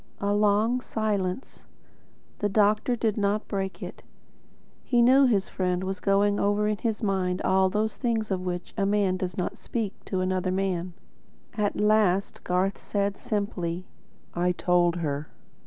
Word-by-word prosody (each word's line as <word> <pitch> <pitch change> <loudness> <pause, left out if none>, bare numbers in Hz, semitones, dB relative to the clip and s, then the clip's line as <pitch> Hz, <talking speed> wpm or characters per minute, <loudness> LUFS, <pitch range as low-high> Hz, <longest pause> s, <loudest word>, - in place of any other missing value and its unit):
A 200 0 0
long 210 +4 +2
silence. 210 -1 -3 0.7
The 205 - 0
doctor 210 +4 +2
did 220 -2 -1
not 205 +1 0
break 195 -1 -3
it. - - -8 0.8
He 245 - +1
knew 260 +3 +6
his 205 -6 +1
friend 180 -1 -1
was 190 0 -3
going 200 +1 +2
over 205 +1 +2
in 210 0 0
his 225 -1 -2
mind 185 -3 0
all 190 0 +3
those 210 +2 -1
things 225 -4 -1
of 185 -1 0
which 180 -1 -4
a 200 - 0
man 200 -2 +2
does 185 -2 -4
not 180 - -3
speak 220 -4 -3
to 190 -2 -2
another 185 0 0
man. 185 -2 -1 0.6
At 210 -2 -1
last 210 -3 +2
Garth 185 +2 0
said 200 -1 -1
simply, 185 -5 -3 0.5
"I 180 +1 +1
told 175 -1 +2
her." 150 -3 -3
200 Hz, 155 wpm, -26 LUFS, 185-210 Hz, 0.8 s, knew